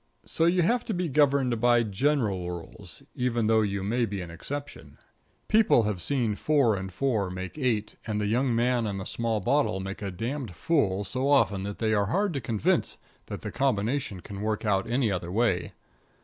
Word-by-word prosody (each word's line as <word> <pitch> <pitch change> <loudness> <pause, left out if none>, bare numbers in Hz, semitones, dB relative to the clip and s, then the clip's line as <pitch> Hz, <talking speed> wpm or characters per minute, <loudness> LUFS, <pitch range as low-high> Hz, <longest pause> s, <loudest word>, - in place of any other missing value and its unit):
So 165 - 0
you 175 +1 +3
have 240 +7 +2
to 220 - -2
be 175 0 -1
governed 135 -5 +2
by 120 -1 +4
general 105 -5 0
rules, 85 -2 -8
even 120 -2 0
though 110 0 +4
you 100 -2 -1
may 115 +4 0
be 100 -1 -4
an 85 -2 -7
exception. 140 - -7 0.5
People 215 - +4
have 105 -4 -2
seen 120 -4 0
four 135 -1 +2
and 95 0 -5
four 110 -2 0
make 95 +1 -6
eight, 115 -6 -1
and 105 -1 -1
the 105 - -1
young 120 +3 +1
man 120 -1 +1
and 100 -1 -3
the 95 - -5
small 115 -2 -1
bottle 140 -3 +1
make 95 +2 -6
a 100 - -3
damned 115 - -4
fool 100 - +1
so 130 +7 -2
often 105 -9 +3
that 100 +1 -5
they 110 -1 0
are 100 -2 +2
hard 195 - 0
to 140 - -3
convince 110 -4 0 0.3
that - - -6
the - - -4
combination 120 -5 -1
can 100 +1 -8
work 110 +1 -2
out 105 +1 +1
any 120 -2 +1
other 90 -2 -3
way. 100 -4 +1
115 Hz, 195 wpm, -27 LUFS, 100-135 Hz, 0.5 s, by